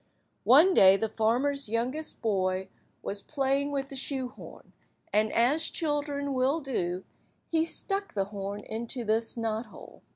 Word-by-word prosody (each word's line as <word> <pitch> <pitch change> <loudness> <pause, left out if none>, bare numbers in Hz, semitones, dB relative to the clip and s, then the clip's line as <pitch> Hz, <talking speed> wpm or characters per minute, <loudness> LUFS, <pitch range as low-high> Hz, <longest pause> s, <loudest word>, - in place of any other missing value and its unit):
One 310 +10 +7
day 195 - +7
the 225 - -1
farmer's 245 +5 0
youngest 250 +8 -2
boy 190 -3 0 0.3
was 200 0 -4
playing 275 +1 0
with 275 -1 -3
the 275 - -7
shoe–horn, 260 -2 -5 0.4
and, 215 +1 +3
as 280 +8 +3
children 290 -3 -2
will 265 +5 +1
do, 185 - -3 0.5
he 320 -1 +3
stuck 395 - +1
the 195 -1 0
horn 200 0 -6
into 235 +4 -5
this 225 +2 0
knot–hole. 225 -1 -5
245 Hz, 135 wpm, -28 LUFS, 215-285 Hz, 0.5 s, One